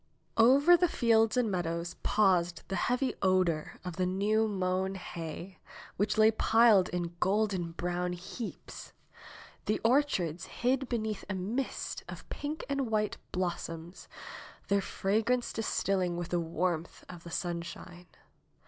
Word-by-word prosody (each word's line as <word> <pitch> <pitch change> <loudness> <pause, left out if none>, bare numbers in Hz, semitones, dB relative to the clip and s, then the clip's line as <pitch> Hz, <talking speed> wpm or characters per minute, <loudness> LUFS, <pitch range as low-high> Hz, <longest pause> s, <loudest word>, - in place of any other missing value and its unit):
Over 275 +9 +7
the 355 +1 +3
fields 225 -6 +3
and 235 -4 +2
meadows 170 -1 -2
paused 180 -5 +2
the 195 - -1
heavy 250 +4 0
odor 185 -5 +1
of 180 -2 -5
the 185 - +1
new 210 +4 +2
mown 190 -1 -1
hay, 175 0 -7 0.4
which 210 +2 0
lay 220 0 +6
piled 220 -4 +5
in 175 -1 -3
golden 190 -4 +1
brown 175 +1 -2
heaps. 190 +5 -8 0.7
The 215 - +1
orchards 225 - +1
hid 260 +1 -1
beneath 220 -3 -2
a 200 - -1
mist 220 +9 -3
of - - -9
pink 300 +2 -4
and 275 -4 -1
white 215 -1 0
blossoms, 175 -1 -4 0.6
their 200 0 +3
fragrance 220 +6 0
distilling 190 -5 0
with 175 0 -4
the 175 - +1
warmth 170 0 -2
of 175 -2 -10
the 170 - -9
sunshine. 175 +1 -5
190 Hz, 130 wpm, -31 LUFS, 175-225 Hz, 0.7 s, Over